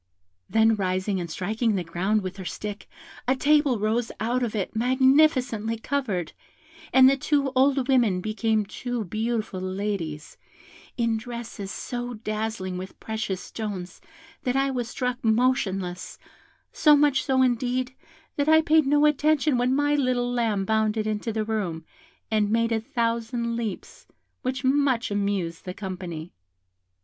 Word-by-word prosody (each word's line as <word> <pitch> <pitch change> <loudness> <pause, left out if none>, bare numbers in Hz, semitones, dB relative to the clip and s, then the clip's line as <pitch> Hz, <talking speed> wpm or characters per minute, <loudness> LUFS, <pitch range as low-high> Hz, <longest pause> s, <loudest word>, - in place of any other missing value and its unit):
Then 220 +2 +4
rising 185 0 -1
and 170 -1 -4
striking 215 +6 -1
the 185 - -1
ground 190 +5 0
with 185 +1 -5
her 190 - -6
stick, 205 +4 -6 0.4
a 260 - +3
table 290 -2 +3
rose 220 +3 0
out 240 +4 0
of 230 -3 -2
it 205 +1 -3
magnificently 255 -2 +3
covered, 220 - -2 0.6
and 260 0 +7
the 275 - +5
two 280 0 0
old 265 0 +3
women 240 -9 +3
became 215 +1 0
two 245 +3 -4
beautiful 215 0 -2
ladies, 185 -5 -4 0.6
in 230 -2 +1
dresses 230 -3 -7
so 245 +3 -5
dazzling 215 -4 -3
with 185 +1 -9
precious 215 -4 -3
stones, 195 -5 -6 0.4
that 250 0 -1
I 270 0 +2
was 245 -3 -3
struck 250 0 -3
motionless, 220 -6 0 0.6
so 300 -1 +6
much 285 -2 +3
so, 260 -1 +3
indeed, 250 +1 0 0.4
that 290 +1 +1
I 315 0 +7
paid 315 -2 +4
no 290 +1 +4
attention 300 -1 +3
when 250 +2 +2
my 290 +1 +2
little 255 -3 +1
lamb 225 -5 0
bounded 220 0 +1
into 215 +1 -2
the 215 0 -2
room, 185 -7 -3 0.5
and 210 -2 +2
made 230 +1 +1
a 225 -1 +1
thousand 235 -2 -1
leaps, 225 -5 -6 0.3
which 255 +1 -3
much 260 -4 +2
amused 200 -5 -1
the 180 0 -5
company. 180 -4 -6
225 Hz, 145 wpm, -25 LUFS, 200-255 Hz, 0.6 s, and